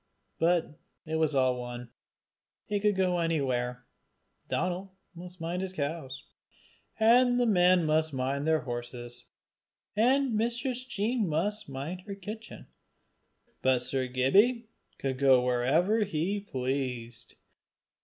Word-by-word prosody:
But 165 -2 +1 0.3
it 160 0 -2
was 155 -2 +1
all 130 -2 +2
one; 120 -1 -7 0.7
he 205 -1 -1
could 210 0 +2
go 180 -2 +1
anywhere. 125 -7 -1 0.6
Donal 185 +2 -2 0.2
must 180 +1 -9
mind 170 +2 -3
his 190 -1 -4
cows, 145 -4 -4 0.8
and 245 +2 +5
the 245 - +3
men 180 -4 +4
must 155 +1 +2
mind 135 +2 -2
the 160 -1 +3
horses, 120 0 -6 0.7
and 255 +4 +3
Mistress 240 +3 -1
Jean 225 -3 -1
must 205 +7 -1
mind 145 +7 -5
her 200 - -5
kitchen, 210 +3 -9 1.0
but 130 -1 +2
Sir 130 +1 -1
Gibbie 205 - +3 0.3
could 130 -1 -3
go 135 -2 +6
where 135 - +2
he 195 +1 -1
pleased. 130 - -4
165 Hz, 120 wpm, -29 LUFS, 130-205 Hz, 1.0 s, go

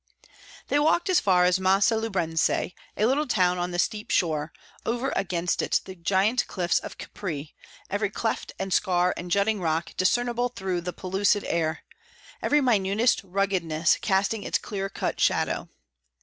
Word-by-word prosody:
They 290 - +3
walked 320 +5 +2
as 365 - +5
far 180 -2 +3
as 180 +1 +3
Massa 195 +4 +3
Lubrense, 180 -8 0 0.5
a 210 - +2
little 280 +6 +1
town 180 -6 +2
on 175 0 -1
the 175 - -4
steep 210 +4 -1
shore; 160 -2 0 0.3
over 240 +3 -1
against 180 -2 0
it - - +1
the 190 - -8
giant 195 +7 +1
cliffs 180 -2 0
of - - -9
Capri, 155 -7 -6 0.3
every 205 +1 -1
cleft 225 +2 -3
and 190 -1 -3
scar 180 -1 +2
and 175 - -7
jutting 200 +2 +1
rock 165 0 -1
discernible 240 +5 +1
through 190 -6 -3
the 180 +1 -4
pellucid 195 +3 0
air, 160 -1 -1 0.6
every 295 0 +3
minutest 220 -1 +2
ruggedness 180 -4 +1
casting 200 +2 +1
its - - 0
clear 195 -2 -4
cut - - -3
shadow. - - +1
190 Hz, 155 wpm, -26 LUFS, 175-220 Hz, 0.6 s, as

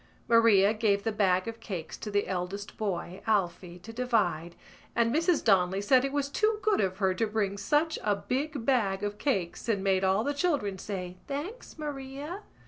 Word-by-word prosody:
Maria 220 -3 +5
gave 210 -2 +1
the 225 - 0
bag 190 -3 +2
of 230 0 -5
cakes 175 -6 -6
to 215 - -7
the 205 0 0
eldest 190 +2 -4
boy, 185 -3 -3
Alphy, 180 -4 0
to 225 - -9
divide 215 -9 0 0.4
and 235 0 +2
Mrs 335 +1 +2
Donnelly 190 -2 +3
said 250 +6 +4
it 275 - -1
was 285 -1 0
too 430 +9 +1
good 430 -1 +3
of 190 -1 -1
her 190 -2 +2
to 220 +4 0
bring 210 -2 -1
such 295 +11 +1
a 210 -1 +2
big 270 +5 -3
bag 205 -7 +1
of 205 0 -3
cakes 195 - -1
and 200 -4 +1
made 190 -1 +2
all 190 +3 +3
the 285 - 0
children 280 - 0
say: 180 -3 -5
"Thanks, 315 - -6
Maria." 290 +4 -6
210 Hz, 185 wpm, -29 LUFS, 190-270 Hz, 0.4 s, Maria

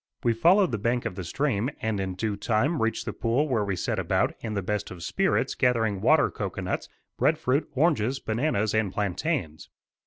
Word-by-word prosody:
We 120 -2 +3
followed 180 - +4
the 115 - -2
bank 120 +3 0
of - - -2
the 95 0 -6
stream 125 - 0
and 110 -2 -1
in 95 -1 -3
due 105 +2 -2
time 115 +9 0
reached 115 0 0
the - - -3
pool 125 +6 0
where 115 -6 +1
we 100 -2 -1
set 90 - -2
about, - - +1
in 110 -2 -4
the 100 - -1
best 105 +2 -2
of 90 -2 -9
spirits, - - +1
gathering 115 -6 +1
water - - +4
cocoanuts, - - -4 0.3
bread - - +3
fruit, 135 +5 0
oranges, 135 -4 +2
bananas 110 -2 0
and 110 -3 +1
plantains. 100 - -2
110 Hz, 190 wpm, -26 LUFS, 100-130 Hz, 0.3 s, followed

